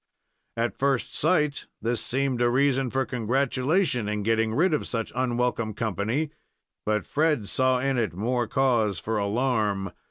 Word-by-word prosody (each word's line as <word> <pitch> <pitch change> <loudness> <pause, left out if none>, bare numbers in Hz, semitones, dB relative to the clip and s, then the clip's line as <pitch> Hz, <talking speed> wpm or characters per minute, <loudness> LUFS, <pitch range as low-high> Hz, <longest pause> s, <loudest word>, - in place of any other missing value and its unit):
At 115 +1 -1
first 135 -3 0
sight 150 -3 +1
this 115 +2 -1
seemed 130 -1 0
a 120 - +4
reason 135 0 +2
for 135 +2 0
congratulation 130 - 0
in 105 -1 -2
getting 115 +1 +1
rid 170 +5 +3
of 150 - -1
such 115 -2 -3
unwelcome 120 -3 0
company; 115 - -1 0.6
but 105 0 +1
Fred 150 -8 +1
saw 130 +3 +2
in 130 0 0
it 105 -7 -1
more 120 +4 0
cause 120 -8 +2
for 110 +6 -2
alarm. 105 -3 0
120 Hz, 150 wpm, -26 LUFS, 110-135 Hz, 0.6 s, a